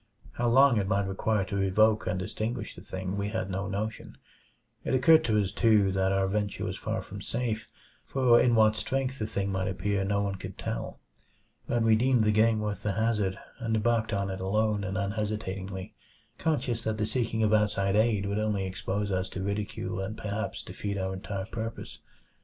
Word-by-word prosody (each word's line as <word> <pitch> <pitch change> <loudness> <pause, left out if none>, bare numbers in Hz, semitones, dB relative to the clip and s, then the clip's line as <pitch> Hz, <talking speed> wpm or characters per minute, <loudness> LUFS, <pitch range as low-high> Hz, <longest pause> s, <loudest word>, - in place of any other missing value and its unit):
How 120 - -1
long 135 0 +6
it 100 -2 0
might 100 0 +1
require 100 +1 0
to 100 0 -2
evoke 110 +3 +3
and 90 +1 0
extinguish 110 +3 -3
the - - -12
thing, 95 +1 -4
we 100 +1 -1
had 110 -3 -3
no 95 +1 -2
notion. 105 +3 -4 0.7
It - - 0
occurred 155 +5 +6
to 110 -2 +3
us, 100 -2 0
too, 105 -4 +4
that 95 0 +1
our 95 0 +2
venture 100 0 -1
was - - -3
far - - -3
from - - -9
safe; 115 -2 -3 0.4
for 125 -3 +4
in 120 -1 +4
what 110 -1 +5
strength 135 +3 -2
the 110 - -1
thing 100 -2 -2
might 95 -1 -1
appear 100 +1 -1
no 100 +1 +1
one 100 -1 -2
could - - -8
tell. - - -4 0.7
But 120 -1 +1
we 110 -1 +5
deemed 125 0 +3
the 105 - +3
game 110 +1 +3
worth 105 -1 -3
the 105 - -1
hazard, 105 -3 0 0.2
and 115 -1 -1
embarked 110 0 +1
on 100 -2 -1
it 95 - -5
alone 105 +1 +1
and 95 0 -3
unhesitatingly; 100 -2 -3 0.5
conscious 130 -7 0
that 110 -1 -1
the 110 - 0
seeking 115 -1 0
of 110 0 +3
outside 100 -2 +2
aid 105 -2 +3
would 100 +1 -1
only 105 -3 0
expose 100 +2 -2
us 95 0 -1
to 95 - -5
ridicule 100 -1 -3
and 95 +3 -4
perhaps 105 +1 -3
defeat 100 -1 -4
our 95 0 -2
entire 95 0 -4
purpose. 115 +1 -6
105 Hz, 195 wpm, -29 LUFS, 95-110 Hz, 0.7 s, long